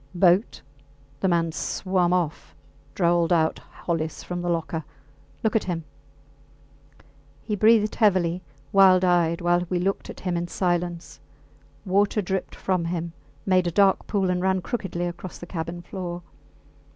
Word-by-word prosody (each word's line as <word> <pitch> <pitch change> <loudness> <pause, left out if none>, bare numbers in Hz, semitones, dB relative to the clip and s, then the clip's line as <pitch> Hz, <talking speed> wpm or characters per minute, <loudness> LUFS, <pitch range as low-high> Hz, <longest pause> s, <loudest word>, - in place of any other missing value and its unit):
Boat! 180 - +3 0.6
The 190 - +1
mans 165 -2 +1
swum 185 -2 0
off, 175 -4 -2 0.4
drawled 170 -2 +2
out 160 -2 +2
Hollis 160 -2 -4
from 175 0 -4
the 175 - -2
locker. 165 -1 -2 0.6
Look 220 - +1
at 220 - +2
him! 170 -3 -3 1.6
He 210 - -2
breathed 215 0 +4
heavily, 185 -5 +2 0.3
wild 190 -2 +6
eyed, 170 -2 +2
while 175 0 +2
we 180 - 0
looked 195 +3 -1
at - - -9
him 180 -2 -1
in 170 0 -2
silence. 175 -1 -2 0.7
Water 200 +2 +2
dripped 190 -1 -3
from 185 -3 -1
him, 170 -1 -3 0.3
made 185 -2 +3
a - - 0
dark 195 +2 +3
pool, 195 -3 +1
and 180 0 -1
ran 190 0 +1
crookedly 175 -6 -3
across 175 +1 -6
the - - -9
cabin 175 0 -5
floor. 175 -1 -6
175 Hz, 145 wpm, -25 LUFS, 170-190 Hz, 1.6 s, wild